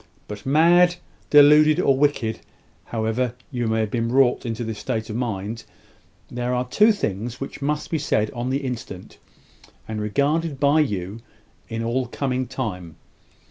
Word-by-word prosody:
"But 105 +4 -8
mad, 175 +5 +5 0.3
deluded, 150 +1 +6
or 135 - +3
wicked 135 -5 0 0.5
however 115 +2 -2 0.2
you 120 -3 -2
may 110 0 +1
have 110 -2 -2
been 115 0 -1
wrought 125 -1 +2
into 115 +1 -3
this 110 -2 -5
state 110 -3 -3
of - - -5
mind, 115 -2 -3 0.6
there 125 +1 -2
are 125 0 -1
two 210 - +4
things 120 - -3
which 135 - -7
must 150 +2 -2
be 160 - 0
said 110 -7 0
on 120 +1 -4
the 135 +1 -2
instant, 115 -7 -7 0.7
and 110 -1 -4
regarded 145 +7 0
by 145 +2 +4
you 105 - -2 0.5
in 115 0 -3
all 125 +2 -1
coming 130 -2 -2
time. 90 - -5
125 Hz, 155 wpm, -23 LUFS, 110-140 Hz, 0.7 s, deluded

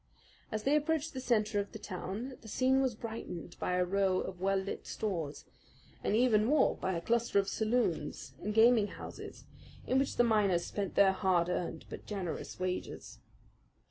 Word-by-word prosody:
As 215 -1 -2
they 280 +2 +3
approached 315 +1 0
the 260 - -4
centre 215 -4 +1
of 200 +2 -4
the - - -5
town 210 +6 -5
the 220 - -12
scene 260 +4 +2
was 260 -4 0
brightened 215 -7 -6
by - - -1
a 180 0 +2
row 190 0 +2
of 180 -1 -5
well 195 +1 +2
lit 190 +1 -4
stores, 170 -9 -3 0.6
and 205 - +1
even 225 -3 +4
more 285 +7 +3
by 190 - -2
a 170 - -2
cluster 235 +2 +1
of 195 -1 +3
saloons 215 - -1
and 210 - -2
gaming 225 0 +5
houses, - - -9 0.4
in 260 - +2
which 275 - 0
the 240 - +4
miners 205 -6 +3
spent 200 -2 -3
their 195 -1 +6
hard 185 -3 +2
earned 175 -2 -3
but - - -9
generous 190 -5 -4
wages. 185 0 -4
210 Hz, 175 wpm, -32 LUFS, 185-235 Hz, 0.6 s, their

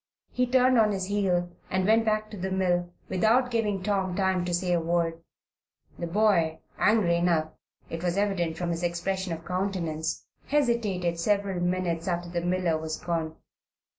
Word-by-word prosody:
He 250 0 +1
turned 255 0 +4
on 215 -2 +4
his 190 -1 -2
heel 185 -3 0 0.2
and 185 0 0
went 225 +2 +4
back 215 0 0
to 210 - -7
the 190 +1 -3
mill 175 -2 0 0.2
without 230 +7 +2
giving 210 -5 0
Tom 190 -2 0
time 190 -2 +1
to 180 - -2
say 175 +1 0
a 175 - +3
word. 165 0 0 0.8
The 170 - -2
boy, 170 -4 +2 0.2
angry 200 -6 +3
enough, 165 -3 +1 0.4
it 165 - -5
was 175 +1 0
evident 185 -5 0
from 175 0 -2
his 170 0 -3
expression 180 +2 -2
of 165 -1 -5
countenance, 175 -4 -2 0.2
hesitated 215 -11 +1
several 200 0 0
minutes 175 -1 -1
after 175 -1 -2
the 170 0 -2
miller 175 -2 0
was 160 0 -4
gone. 165 -2 -3
180 Hz, 165 wpm, -27 LUFS, 170-205 Hz, 0.8 s, turned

